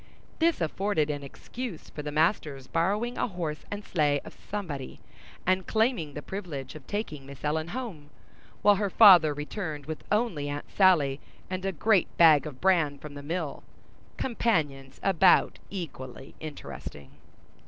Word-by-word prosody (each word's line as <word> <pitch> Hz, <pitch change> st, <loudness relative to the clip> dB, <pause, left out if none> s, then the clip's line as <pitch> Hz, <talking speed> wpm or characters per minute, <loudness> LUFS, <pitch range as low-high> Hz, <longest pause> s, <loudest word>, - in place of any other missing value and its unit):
This 330 Hz, -, +2 dB
afforded 165 Hz, -2 st, 0 dB
an 145 Hz, -1 st, -4 dB
excuse 215 Hz, -, -7 dB
for 150 Hz, -, -6 dB
the 150 Hz, 0 st, -5 dB
master's 150 Hz, -3 st, +1 dB
borrowing 205 Hz, -, 0 dB
a -, -, +1 dB
horse 170 Hz, -7 st, -4 dB
and 205 Hz, 0 st, -5 dB
sleigh 145 Hz, -4 st, +2 dB
of -, -, -10 dB, 0.2 s
somebody, 165 Hz, -10 st, -5 dB, 0.5 s
and 185 Hz, 0 st, +1 dB
claiming 220 Hz, -, +1 dB
the 150 Hz, -, -6 dB
privilege 160 Hz, -10 st, -6 dB
of 155 Hz, -4 st, -12 dB
taking 205 Hz, -9 st, -4 dB
Miss 140 Hz, -1 st, -11 dB
Ellen 155 Hz, +2 st, 0 dB
home, 180 Hz, -, -6 dB, 0.5 s
while 205 Hz, -1 st, +6 dB
her 205 Hz, 0 st, 0 dB
father 185 Hz, -8 st, +8 dB
returned 150 Hz, 0 st, -5 dB
with 160 Hz, +1 st, -6 dB
only 205 Hz, -10 st, 0 dB
Aunt 145 Hz, 0 st, -4 dB
Sally 155 Hz, -8 st, +4 dB, 0.3 s
and 185 Hz, 0 st, -3 dB
a 195 Hz, -, +1 dB
great 195 Hz, +2 st, +3 dB
bag 155 Hz, -3 st, +7 dB
of 135 Hz, -4 st, -9 dB
bran 170 Hz, -7 st, +3 dB
from 145 Hz, +1 st, -10 dB
the 145 Hz, -, -8 dB
mill—companions 155 Hz, -, -3 dB
about 190 Hz, -1 st, +4 dB
equally 135 Hz, -8 st, -7 dB
interesting. 145 Hz, -, -8 dB
160 Hz, 145 wpm, -28 LUFS, 145-195 Hz, 0.5 s, father